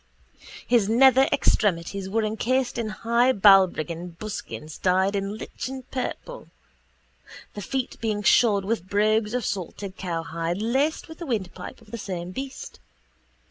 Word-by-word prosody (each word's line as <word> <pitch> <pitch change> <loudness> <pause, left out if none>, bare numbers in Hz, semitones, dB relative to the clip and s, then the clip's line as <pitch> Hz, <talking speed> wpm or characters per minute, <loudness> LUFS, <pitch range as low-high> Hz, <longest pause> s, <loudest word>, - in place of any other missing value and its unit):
His 230 -5 +3
nether 265 +3 +6
extremities 195 -5 +1
were 220 +3 +1
encased 240 +4 0
in 225 -2 -2
high 235 +4 +2
Balbriggan 180 -4 +4
buskins 180 -7 -7
dyed 190 +2 +2
in 200 +1 -2
lichen 260 +3 -6
purple, 390 - -5 1.1
the 205 - -6
feet 260 +6 -3
being 215 -2 -1
shod 205 -2 +4
with 200 -3 -2
brogues 215 +2 +2
of 250 - -1
salted 195 0 -5
cowhide 165 0 -3
laced 265 +8 0
with 320 -1 -11
the 340 - -6
windpipe 215 -3 -4
of 215 -2 -18
the 235 - -5
same 180 -3 -5
beast. 270 +6 -7
210 Hz, 135 wpm, -25 LUFS, 190-240 Hz, 1.1 s, nether